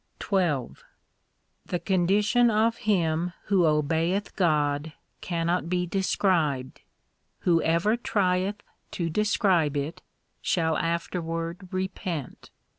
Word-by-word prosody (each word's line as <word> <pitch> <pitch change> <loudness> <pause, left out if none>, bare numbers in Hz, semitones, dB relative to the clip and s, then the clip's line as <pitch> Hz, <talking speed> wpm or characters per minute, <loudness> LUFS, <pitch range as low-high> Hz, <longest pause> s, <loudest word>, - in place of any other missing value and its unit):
XII 170 - 0 1.0
The 180 - -1
condition 200 +6 +3
of 225 +1 +2
him 170 -2 +1
who 185 -4 +3
obeyeth 160 +6 0
God 150 -4 +1 0.3
cannot 170 0 -1
be 180 0 0
described. 170 -7 0 0.6
Whoever 170 +4 +2
trieth 200 -3 0 0.3
to 165 -2 -2
describe 185 -6 +2
it, 145 +3 -4 0.4
shall 160 -3 +1
afterward 170 +1 -3
repent. 185 -5 -4
175 Hz, 90 wpm, -26 LUFS, 160-190 Hz, 1.0 s, condition